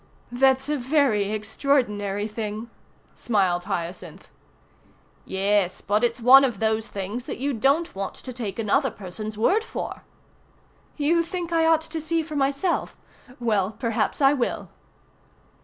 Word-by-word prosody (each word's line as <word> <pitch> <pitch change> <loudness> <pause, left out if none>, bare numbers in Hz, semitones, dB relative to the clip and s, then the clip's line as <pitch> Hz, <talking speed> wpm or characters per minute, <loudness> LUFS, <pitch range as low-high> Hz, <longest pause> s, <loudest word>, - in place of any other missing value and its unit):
"That's 265 +2 +3
a 300 0 0
very 245 -7 +2
extraordinary 210 -2 0
thing," 215 +1 -5 0.4
smiled 185 -6 0
Hyacinth. 175 +1 -5 1.0
"Yes, 195 -1 +1
but 210 +3 0
it's 240 +1 +1
one 260 +4 +8
of 245 -6 0
those 220 0 0
things 205 +5 -5
that - - -5
you 280 +3 -1
don't 275 +8 +1
want 195 0 -4
to 255 - -8
take 220 -6 -5
another 260 +5 +1
person's 210 +1 -7
word 390 - +2
for." - - -6 1.0
"You 320 +3 +3
think 345 0 -4
I 325 -1 +3
ought 325 -1 +4
to 320 0 -5
see 325 +1 0
for 305 -1 -7
myself? 280 +6 0 0.4
Well, 215 -4 0
perhaps 230 +5 -1
I 270 +1 +6
will." 255 -4 -2
235 Hz, 140 wpm, -24 LUFS, 205-280 Hz, 1.0 s, one